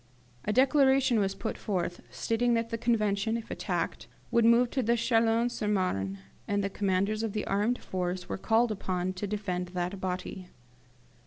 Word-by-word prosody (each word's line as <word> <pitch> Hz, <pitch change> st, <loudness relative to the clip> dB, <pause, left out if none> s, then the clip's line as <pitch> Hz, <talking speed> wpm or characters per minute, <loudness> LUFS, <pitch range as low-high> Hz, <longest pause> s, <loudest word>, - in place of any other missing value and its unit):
A -, -, +1 dB
declaration 265 Hz, -1 st, +4 dB
was 195 Hz, -1 st, 0 dB
put -, -, -4 dB
forth, 180 Hz, -3 st, -2 dB
stating 235 Hz, +1 st, +1 dB
that 230 Hz, 0 st, -1 dB
the 230 Hz, -, -1 dB
Convention, 220 Hz, -1 st, +1 dB
if 230 Hz, -, -8 dB
attacked, -, -, -3 dB, 0.2 s
would 235 Hz, -1 st, +4 dB
remove 235 Hz, +1 st, +5 dB
to 265 Hz, -, 0 dB, 0.2 s
Chalons 230 Hz, 0 st, +2 dB
sur 210 Hz, -, -3 dB
Marne; 100 Hz, -, 0 dB, 0.3 s
and 200 Hz, 0 st, 0 dB
the 195 Hz, -, -2 dB
commanders 200 Hz, +2 st, 0 dB
of 225 Hz, -3 st, -2 dB
the 215 Hz, -, -2 dB
armed 210 Hz, +5 st, +1 dB
force 180 Hz, 0 st, -3 dB
were -, -, -4 dB
called 225 Hz, +3 st, +2 dB
upon 185 Hz, -2 st, -2 dB
to 190 Hz, +2 st, -4 dB
defend 190 Hz, -3 st, -2 dB
that 180 Hz, +2 st, -3 dB
body. 185 Hz, 0 st, -4 dB
210 Hz, 165 wpm, -29 LUFS, 185-230 Hz, 0.3 s, remove